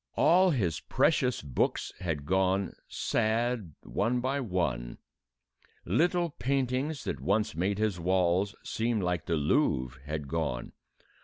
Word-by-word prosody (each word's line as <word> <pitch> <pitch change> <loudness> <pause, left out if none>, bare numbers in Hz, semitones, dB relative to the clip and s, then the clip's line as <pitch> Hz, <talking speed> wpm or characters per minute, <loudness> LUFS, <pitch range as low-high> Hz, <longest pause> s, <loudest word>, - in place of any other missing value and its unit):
All 185 +2 +5
his 95 - 0
precious 125 - +1
books 65 -4 -1
had 80 -5 -3
gone, 95 +2 +1
sad 115 -4 0
one 125 +1 0
by 130 +3 -1
one. 80 - -2 0.9
Little 170 - +2
paintings 135 +1 -1
that 70 - -3
once 105 - +1
made 95 +4 0
his 105 -4 0
walls 95 +3 +1
seem 115 0 -1
like 90 -4 -1
the 85 - +1
Louvre 70 - +1
had 75 -2 -3
gone. 75 -5 -2
95 Hz, 125 wpm, -29 LUFS, 80-125 Hz, 0.9 s, All